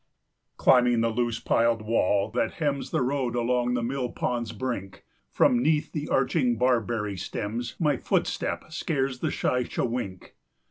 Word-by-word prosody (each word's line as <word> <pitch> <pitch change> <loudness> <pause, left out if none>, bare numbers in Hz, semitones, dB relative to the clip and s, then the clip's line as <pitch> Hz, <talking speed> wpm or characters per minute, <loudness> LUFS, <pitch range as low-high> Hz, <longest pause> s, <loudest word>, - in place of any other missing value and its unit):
Climbing 125 -3 +4
the 115 0 +1
loose 120 0 -1
piled 115 -1 +2
wall 105 -2 +1
that 115 0 0
hems 145 -4 -2
The - - 0
road 130 -2 -1
along 125 +1 +1
the 120 - -1
mill 125 +1 -2
pond's 120 -2 -2
brink, 110 -4 -4
10 - - -17 0.3
From 120 -1 +3
'neath 150 +2 +1
the 150 -1 -4
arching 130 -2 +2
barberry 115 -4 +1
stems, 115 +6 -4
My 150 -5 +2
footstep - - -1
scares 135 -5 -1
the - - 0
shy 125 - 0
chewink. 115 -8 -4
120 Hz, 150 wpm, -26 LUFS, 115-130 Hz, 0.3 s, Climbing